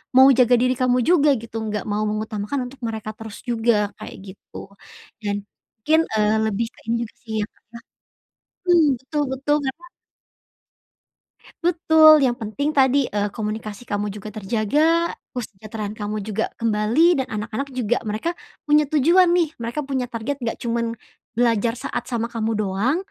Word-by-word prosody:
mau 260 +1 +9
jaga 250 -1 +5
diri 255 +1 +1
kamu 255 -1 +3
juga, 300 0 +4
gitu, 225 0 -6
enggak 210 -2 -3
mau 210 +1 0
mengutamakan 215 +4 -3
untuk 275 - -15
mereka 220 -1 -4
terus 220 -2 -9
juga, 225 -4 +1
kayak - - -8 0.2
gitu. - - -29 0.7
Dan, 205 -1 -1 0.5
mungkin, 315 +1 +5 0.2
eee, 210 +1 +3
lebih 220 +2 -1
ke - - -21
ini 235 - +2
juga 235 - -6
sih, 220 -2 -7
ya, 205 - 0
Kak, - - -35
ya 235 - -8 0.9
mmm, 335 -3 +6 0.2
betul 295 +3 -2
betul 285 +3 +1
ya, 265 - 0
Kak. 345 - -14 1.8
Betul! 320 -3 +6
Yang 245 -2 +2
penting 230 +7 -2
tadi, 275 -1 +4
eee, 205 0 0
komunikasi 215 0 -4
kamu 205 -2 -2
juga 210 +1 -8
terjaga, 240 - +1 0.2
kesejahteraan 215 -2 -6
kamu 210 -1 -4
juga 215 +1 -2
kembali, 225 +6 +2
dan 265 - -1
anak-anak, 225 +6 -3
juga, 240 -1 +1
mereka 215 +11 -1 0.3
punya 300 -1 +3
tujuan 335 +6 +4
nih, 335 -4 +2
mereka 235 +6 -3
punya 265 -2 -2
target 250 +4 -4
enggak 235 -3 -2
cuman 235 0 0 0.5
belajar 230 -1 +2
saat 245 -1 -4
sama 235 -1 -2
kamu 225 -1 -1
doang. 215 - 0
235 Hz, 160 wpm, -22 LUFS, 215-275 Hz, 1.8 s, mau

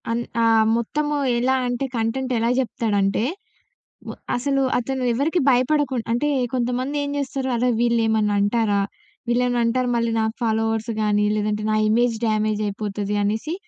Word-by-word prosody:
అన్ 230 +1 0 0.2
ఆహ్, 225 -1 +4
మొత్తము 295 +6 -1 0.2
ఎలా 255 +2 +2
అంటే 245 +2 -2
కంటెంట్ 240 +3 -1
ఎలా 230 +1 +1
జెప్తాడంటే, 215 -5 0 0.9
వ - - -4 0.2
అసలు 275 +2 0 0.2
అతను 260 +1 -2
ఎవరికీ 300 +9 0
భయపడకుండ్ 260 -1 +2
అంటే 240 +6 +1 0.3
కొంతమంది 250 +3 -1
ఏం 285 - -3
జేస్తారు, 270 -1 -2
అరే 250 +2 +1
వీళ్ళేమన్నా 225 -3 +2
అంటారా? 205 0 +1 0.5
వీళ్లేమైనా 245 0 +1
అంటారు 250 +2 0
మళ్ళీ 235 0 0
నాక్ 220 +1 -1
ఫాలోవర్స్ 225 0 0
గాని 210 -1 +2
లేదంటే 210 0 -1
నా 215 - +2
ఇమేజ్ 235 +1 +2
డ్యామేజ్ 215 -1 0
అయిపోతది 205 0 -3
అనేసి, 220 +11 -1
235 Hz, 140 wpm, -22 LUFS, 215-255 Hz, 0.9 s, ఆహ్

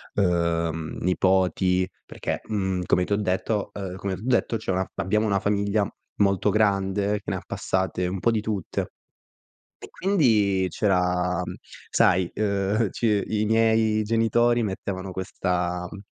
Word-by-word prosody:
uhm, 85 -3 0
nipoti. 95 0 +2 0.2
Perché, - - -4
mhmm, 95 -4 -1
come 90 - +2
ti 100 - -1
ho - - +2
detto 105 +1 -1
ehm, 95 -3 -5
come 95 -1 -3
t'ho 90 - -11
detto, 120 -2 +1
c'è 110 - -3
una 95 0 +1
fa - - -6
abbiamo 105 +4 +1
una 100 -2 +2
famiglia 100 +1 +1 0.3
molto 100 -2 +3
grande 100 -1 +1
che - - -26
ne - - -1
ha - - -4
passate 95 -1 -1
un 95 +1 -3
po' 115 - +2
di 110 -2 0
tutte. 105 -4 -3 0.9
E - - -9
quindi 110 - +2
c'era, 90 -2 +1 0.5
sai, 90 -1 +3
uhm, 100 +1 +1
c 105 -2 +1
i 105 -1 0
miei 110 -1 +3
genitori 115 +2 +2
mettevano 95 -1 -4
questa 90 -1 -2
m 100 - -8
100 Hz, 150 wpm, -25 LUFS, 90-105 Hz, 0.9 s, molto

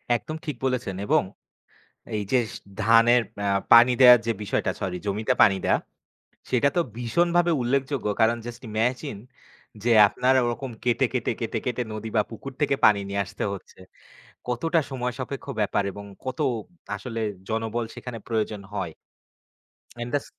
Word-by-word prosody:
একদম 155 +6 -4
ঠিক 150 - -3
বলেছেন। 125 -7 -1
এবং - - +3 0.9
এই 105 - -1
যেস 120 -4 +2 0.3
ধানের 115 +2 +5 0.2
আ - - +1 0.2
পানি 120 +2 +8
দেয়ার 125 -2 +10
যে 115 - +2
বিষয়টা, 105 - -1
সরি 90 -2 -2
জমিতে 110 +5 0
পানি 95 - +6
দেয়া, - - +3 0.7
সেটা 130 +3 +3
তো - - +4 0.2
ভীষণভাবে 170 +8 +2
উল্লেখযোগ্য। 135 -1 -1
কারণ, 115 +1 +4
just 120 +1 -8
imagine 120 +2 -1 0.6
যে, 120 - +1 0.2
আপনার 130 +5 +2
ওরকম 120 +2 -3
কেটে, 125 +2 +2
কেটে, 125 -2 0
কেটে, 115 0 -2
কেটে 125 0 -1
নদী 110 +1 -5
বা 105 - +5
পুকুর 130 +4 -8
থেকে 140 -2 +2
পানি 105 -2 +6
নিয়ে 100 0 -1
আসতে - - -5
হচ্ছে। 100 - -10 0.7
কতটা 165 +8 +1
সময় 125 -2 -2
সাপেক্ষ 135 +1 -5
ব্যাপার 100 -1 +1
এবং 100 +1 -9 0.2
কত 130 -1 -4 0.6
আসলে 115 -3 -5 0.3
জনবল 115 +1 -2
সেখানে 120 -2 -7
প্রয়োজন 110 -2 -1
হয়। 95 -5 -3 1.1
অ্যান্ড 120 0 -5
দাছ 145 - -1
120 Hz, 150 wpm, -25 LUFS, 110-130 Hz, 1.1 s, দেয়ার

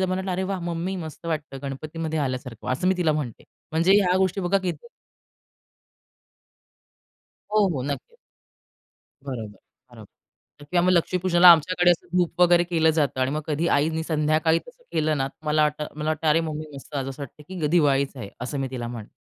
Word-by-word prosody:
तर 185 - +2
मला 185 0 -1
वाटलं 190 0 -4
"अरे 185 +1 -1
वाह! 190 -2 -2
मम्मी, 175 +2 -3
मस्त 160 -1 -8
वाटतं 155 -4 -3
गणपतीमध्ये 155 +4 -4
आल्यासारखं." 130 -4 -4
असं 180 +8 0
मी 190 - +2
तिला 165 -4 +2
म्हणते. 145 -7 -4 0.3
म्हणजे 165 +4 +3
ह्या 180 -2 +2
गोष्टी 190 +1 +1
बघा 190 +2 +2
किती? 185 - -5 2.7
हो, 210 -2 +4
हो. 130 - -2
नक्कीच. 145 - -5 1.1
बरोबर 110 -7 -6 0.3
बरोबर 120 +5 -18
किंवा 175 -1 +3
मग 185 - +4
लक्ष्मीपूजनाला 180 0 +4
आमच्याकडे 175 +2 +3
असं 175 - 0
धूप 175 0 0
वगैरे 175 0 +5
केलं 165 -2 +2
जातं 150 -4 0
आणि 130 +1 +1
मग 150 - -2
कधी 160 +2 0
आईनी 160 +2 +1
संध्याकाळी 155 +1 +2
तसं - - -16
केलं 155 -1 +1
ना, 135 0 0 0.2
मला 155 0 +2
वाटतं, 150 0 0
मला 155 +1 -1
वाटतं, 155 +1 -2
"अरे, 155 +2 +4
मम्मी 155 -1 -4
मस्त, 140 +2 -11
असं 135 +1 -4
वाटतं 140 +3 -10
की 180 -5 -3
दिवाळीच 140 -4 +2
आहे." 100 -5 -7
असं 135 +3 -4
मी 135 - -2
तिला 120 -2 -4
म्हणते. 115 -3 -8
155 Hz, 180 wpm, -24 LUFS, 140-175 Hz, 2.7 s, वगैरे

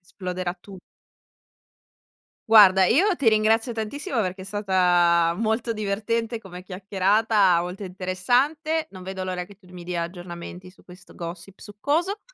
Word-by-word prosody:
esploderà 180 -1 -5
tu 190 +2 -14 1.7
Guarda, 190 -4 +7
io 360 - +3
ti 265 -8 +2
ringrazio 220 +2 +2
tantissimo, 230 +2 -3
perché 185 -1 -3
è - - -9
stata 180 -4 +2
molto 220 +2 -1
divertente 220 +2 -2
come 180 -4 -11
chiacchierata, 195 0 +2
molto 180 +3 -6
interessante. 245 - -1
Non 185 -1 -10
vedo 190 0 -5
l'ora, 180 -1 -3
che 200 +1 -16
tu 190 - -24
mi 180 -1 -9
dia 175 -1 -3
aggiornamenti 175 +1 -8
su 190 - -23
questo 180 0 -15
gossip 175 +3 -8
succoso. 315 - -2
195 Hz, 135 wpm, -24 LUFS, 180-225 Hz, 1.7 s, Guarda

